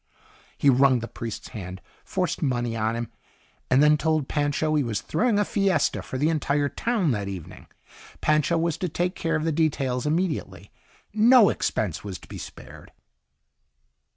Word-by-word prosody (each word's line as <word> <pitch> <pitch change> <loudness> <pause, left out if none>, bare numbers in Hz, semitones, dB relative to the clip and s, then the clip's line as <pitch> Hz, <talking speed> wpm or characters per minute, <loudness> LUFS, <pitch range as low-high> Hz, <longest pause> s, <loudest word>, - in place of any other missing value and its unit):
He - - +1
wrung 135 0 +5
the 115 0 -5
priest's 115 -2 -7
hand, 95 -3 -7 0.2
forced 180 -3 -2
money 120 -5 -1
on 110 0 0
him, 115 -1 -4 0.6
and 130 +3 +5
then 150 0 +5
told 155 -3 +1
Pancho 145 +1 0
he 150 -2 +2
was 110 -4 -2
throwing 220 - 0
a 205 - +2
fiesta 195 -8 +1
for 130 - -6
the 150 +4 +2
entire 145 -2 0
town 215 - 0
that 100 -4 -2
evening. 95 -4 -8 0.5
Pancho 155 +2 +2
was 165 -1 0
to 180 - -2
take 175 +3 -1
care 165 -3 -1
of 155 - -1
the 165 - +1
details 145 -4 0
immediately. 150 - -2 0.4
No 225 -1 +6
expense 100 -8 -2
was 100 -3 -6
to - - -17
be - - -8
spared. - - -11
145 Hz, 165 wpm, -25 LUFS, 120-165 Hz, 0.6 s, No